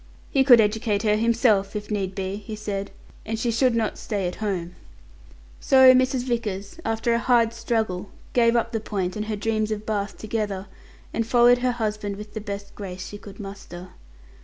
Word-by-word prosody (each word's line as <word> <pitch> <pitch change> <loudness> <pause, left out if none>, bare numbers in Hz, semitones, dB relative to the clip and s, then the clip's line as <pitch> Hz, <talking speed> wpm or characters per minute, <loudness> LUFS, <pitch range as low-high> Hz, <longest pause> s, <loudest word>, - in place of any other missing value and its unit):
"He 270 - +4
could 250 -3 +8
educate 210 -1 +1
her 210 -1 +3
himself, 220 -3 +2
if 210 0 -5
need 195 -2 -2
be," 195 0 -3
he 215 +1 -7
said; 205 -2 -4 0.3
"and 225 0 -3
she 235 +1 0
should 245 +1 +2
not 220 -2 -1
stay 200 -4 -2
at 175 - -5
home." 185 -5 -3 0.9
So 260 -2 +7
Mrs. 255 0 +2
Vickers, 220 - -3
after 225 +1 0
a 235 - +2
hard 235 -2 +3
struggle, 220 -5 -2 0.2
gave 235 -1 +4
up 235 0 +1
the 225 - -1
point 190 -4 -3
and 210 0 -3
her 215 0 -2
dreams 215 +1 -1
of 215 0 -4
Bath 205 -2 -2
together, 210 -3 -3 0.5
and 230 -1 -1
followed 245 +1 +5
her 250 0 +1
husband 215 -3 -3
with 210 +1 -10
the 220 - -4
best 200 -1 -6
grace 185 -2 -7
she 205 - -8
could 200 -1 -12
muster. 195 -3 -9
215 Hz, 185 wpm, -24 LUFS, 200-230 Hz, 0.9 s, could